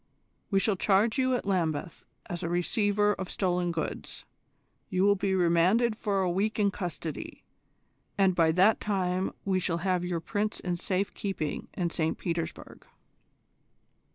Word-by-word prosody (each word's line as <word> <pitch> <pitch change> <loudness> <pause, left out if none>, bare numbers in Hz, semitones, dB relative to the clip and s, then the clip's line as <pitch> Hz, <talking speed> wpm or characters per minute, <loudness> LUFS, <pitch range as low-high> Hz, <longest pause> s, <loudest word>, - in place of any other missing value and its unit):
We 195 - +3
shall 200 -1 +1
charge 210 +6 +2
you 260 -1 +2
at - - -3
Lambeth 170 -4 -1 0.2
as 175 -1 -5
a 165 - -2
receiver 205 +4 +2
of 190 -2 -6
stolen 180 -2 0
goods: 165 -2 -5 0.6
you 185 +1 +1
will 205 0 +6
be 195 -1 0
remanded 185 +7 +3
for 200 -3 0
a 180 - +1
week 205 +5 0
in 205 -2 +3
custody, 170 -5 -5 0.7
and 195 -2 +4
by 165 -2 +3
that 190 +6 +4
time 185 -2 -1
we 190 -1 +1
shall 170 -2 -1
have 180 -2 +1
your 180 -1 -1
Prince 210 +5 -2
in 180 -1 -2
safe 185 +3 -1
keeping 190 -7 -3
in 175 -2 -1
St 160 -1 -1
Petersburg." 165 -2 -5
185 Hz, 155 wpm, -29 LUFS, 175-205 Hz, 0.7 s, will